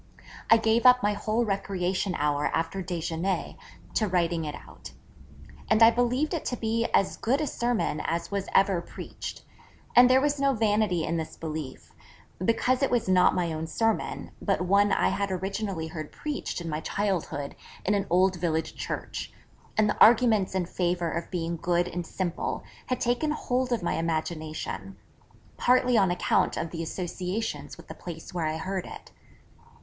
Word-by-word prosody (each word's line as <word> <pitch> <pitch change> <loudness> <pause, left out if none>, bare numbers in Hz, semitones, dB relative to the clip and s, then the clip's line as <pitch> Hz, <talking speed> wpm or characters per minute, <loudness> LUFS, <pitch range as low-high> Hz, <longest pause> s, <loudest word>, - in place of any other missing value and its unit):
I 225 - +8
gave 225 +2 +3
up 250 0 +6
my 205 0 +2
whole 220 +3 0
recreation 195 -2 -1
hour 145 0 +1
after 165 +4 -1
déjeuner 175 +1 -2 0.4
to 215 - +1
writing 170 -3 0
it 150 - -4
out. - - -12 0.8
And 220 +1 +5
I 225 - +9
believed 250 +7 +1
it 330 - -2
to 245 - -2
be 230 +1 0
as 195 - +1
good 260 +5 +1
a 310 - 0
sermon 240 - -1
as 170 +3 -2
was 200 -1 -2
ever 195 -3 +4
preached. - - -8 0.5
And 245 +1 +8
there 260 +1 +6
was 290 +1 0
no 275 0 +3
vanity 210 -6 +2
in 165 +1 -1
this 160 -1 -5
belief: 155 -4 -6 0.5
because 250 +5 +2
it 275 - +2
was 240 -4 +1
not 185 -1 +4
my 175 -3 0
own 160 +1 -4
sermon, 225 +6 -1
but - - 0
one 200 +3 +3
I - - +3
had 200 0 -1
originally 190 -2 -3
heard 155 -2 -6
preached 300 -9 -4
in 170 - -6
my 155 -1 -2
childhood 170 -7 -2 0.3
in 205 - +2
an 200 -1 0
old 185 +1 +3
village 160 -2 -1
church, - - -5 0.5
and 215 -1 +4
the - - -2
arguments 220 -4 +5
in 185 -2 +1
favour 175 -1 -1
of 170 0 -4
being 170 -2 -2
good 175 +1 +1
and 175 -1 -5
simple 180 -3 -3 0.2
had 255 -1 -1
taken 245 +6 +1
hold 255 -4 -1
of 235 -6 0
my - - 0
imagination, 160 +3 -3 0.6
partly 250 0 +3
on 195 -4 +4
account 175 - +1
of 165 - -3
the 165 - -4
associations 180 +5 -4
with - - -14
the - - -7
place 165 -1 -9
where 170 -3 -1
I 155 0 -2
heard 190 +2 -3
it. - - -11
190 Hz, 175 wpm, -27 LUFS, 170-225 Hz, 0.8 s, I